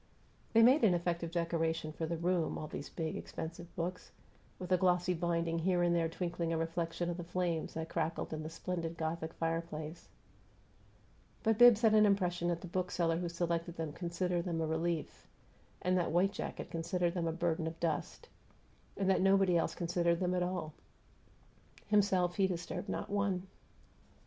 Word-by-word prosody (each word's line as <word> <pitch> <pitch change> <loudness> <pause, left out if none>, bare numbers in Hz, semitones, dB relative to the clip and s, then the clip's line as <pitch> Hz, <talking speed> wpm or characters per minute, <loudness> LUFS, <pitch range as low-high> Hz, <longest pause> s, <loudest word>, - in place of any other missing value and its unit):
They 225 0 +7
made 255 +5 +6
an 190 -5 +5
effective 170 -1 -1
decoration 165 -2 -1
for 160 +1 -3
the 170 +1 -2
room, 170 0 0
all - - -4
these 145 -1 -6
big, 160 -2 -3
expensive 170 +2 -6
books, 180 +1 -4 0.5
with 180 0 -7
a 185 - +5
glossy 180 0 +2
binding 170 -1 0
here 175 +1 +2
and 175 0 +3
there 165 -1 +1
twinkling 170 -1 -2
a 165 - +1
reflection 165 +1 -2
of 170 - -4
the 175 - -5
flames 175 -2 -2
that 160 0 -3
crackled 165 0 -2
in 155 - -3
the 155 - -5
splendid 165 0 -4
Gothic 160 0 -3
fireplace; 165 -1 -4 1.3
but 225 0 +2
Bibbs 240 -2 +8
had 220 -1 +6
an 215 -1 +6
impression 180 -3 +1
that 170 -1 -1
the - - -7
bookseller 175 -2 0
who 175 -1 -2
selected 170 0 -2
them 160 -2 -3
considered 175 +1 -2
them 170 -2 -1
a 160 - +1
relief, 160 0 -2 0.6
and 180 0 +2
that 175 - 0
white 180 +4 +3
jacket 190 - -5
considered 170 +1 0
them 170 -2 -1
a - - +1
burden 165 -1 -1
of 165 0 -6
dust, 160 -3 -2 0.7
and 195 - 0
that 190 - +3
nobody 195 -1 +4
else 170 - +1
considered 170 -1 +1
them 180 -1 0
at 180 - +1
all. 175 -4 -2 1.2
Himself, 190 -4 +3
he 195 -1 +4
disturbed 180 +2 -4
not - - -3
one. 200 -2 0
170 Hz, 175 wpm, -34 LUFS, 165-180 Hz, 1.3 s, Bibbs